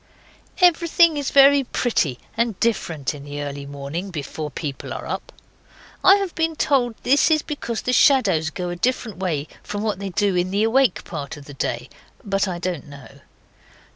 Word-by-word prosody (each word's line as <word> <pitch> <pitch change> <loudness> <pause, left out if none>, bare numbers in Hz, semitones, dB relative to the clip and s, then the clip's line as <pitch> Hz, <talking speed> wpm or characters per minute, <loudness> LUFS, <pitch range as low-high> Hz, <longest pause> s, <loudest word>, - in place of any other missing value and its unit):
Everything 335 -2 +5
is 285 -2 -2
very 275 0 +6
pretty 200 - 0 0.2
and 230 -3 -1
different 160 - -1
in 145 -1 -10
the 145 0 -5
early 140 -1 -6
morning, 145 +7 -5
before 155 -2 -5
people 145 -1 -5
are - - -6
up. - - -5 0.7
I 385 - +8
have 395 -3 -2
been 325 0 -1
told 250 -6 +1
this 280 +5 +4
is 310 -2 +3
because 240 -6 -4
the 250 - 0
shadows 200 - +4
go 180 +2 -4
a - - -4
different 220 0 -2
way 160 -6 -2
from 205 0 -5
what 215 -4 -1
they 200 -1 -4
do 195 +1 +1
in 180 +1 +1
the 200 +3 +1
awake 240 -1 +2
part 145 -4 -6
of 145 - -12
the 145 - -10
day. 125 -2 -3 0.4
But 195 -1 0
I 180 -2 -3
don't 175 -4 -4
know. 140 -1 -13
195 Hz, 180 wpm, -22 LUFS, -, 0.7 s, I